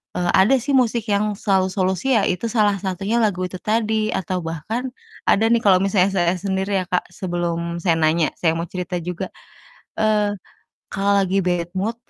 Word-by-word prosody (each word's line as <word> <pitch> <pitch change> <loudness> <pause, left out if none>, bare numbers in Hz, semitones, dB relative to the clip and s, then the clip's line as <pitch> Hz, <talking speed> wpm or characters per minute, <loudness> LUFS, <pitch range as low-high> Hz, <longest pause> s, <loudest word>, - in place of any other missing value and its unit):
eee, 175 -1 0
ada 205 +8 +5
sih 280 +5 -3
musik 235 -3 +2
yang 205 +1 +1
selalu 190 -2 +1
solusi 190 +6 0
ya, 205 - +3 0.2
salah 210 -3 +2
satunya 195 +4 -2
lagu 185 -4 0
itu 185 0 -8
tadi 220 0 0
atau 185 -1 -2
bahkan 215 - -4 0.4
ada 215 - +4
nih 235 - +4
kalo 190 -3 +5
misalnya 195 -1 +2
saya 175 -1 +2
sendiri 190 +1 -1
ya 185 - -3
Kak, 180 - 0
sebelum 170 -1 -3
saya 170 -3 +3
nanya, 155 +1 +2
saya 165 -2 +2
mau 165 - -2
cerita 180 0 -4
juga. 180 +2 -4 0.7
Eee, 210 -1 +2 0.6
kalo 200 0 +2
lagi 190 +1 0
bad 175 -1 0
mood 215 +5 -1
190 Hz, 175 wpm, -21 LUFS, 180-215 Hz, 0.7 s, ada